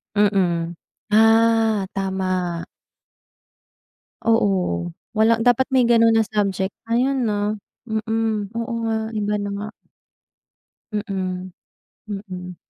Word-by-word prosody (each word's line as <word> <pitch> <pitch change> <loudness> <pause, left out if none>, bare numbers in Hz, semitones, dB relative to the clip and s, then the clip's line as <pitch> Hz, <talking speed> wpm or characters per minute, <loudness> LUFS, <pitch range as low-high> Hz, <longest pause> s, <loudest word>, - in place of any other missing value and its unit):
Mm. 180 -5 +2 0.4
Ah, 225 -1 +4
tama. 185 -3 -2 1.6
Oo, 185 - +1 0.2
wala 225 +1 +4
dapat 245 +2 +4
may 255 -3 +4
ganun 230 -1 +5
na 225 -1 +3
subject 195 -2 -1 0.2
ngayon 265 +3 +2
'no. 210 -1 0 0.3
Mm, 220 -2 -1
oo 230 0 -3
nga 225 -1 0 0.2
iba 210 0 -1
na 205 0 -3
nga. 210 +1 -5 1.2
Mm, 185 -3 -3 0.6
mm. 185 -3 -7
210 Hz, 95 wpm, -22 LUFS, 190-225 Hz, 1.6 s, ganun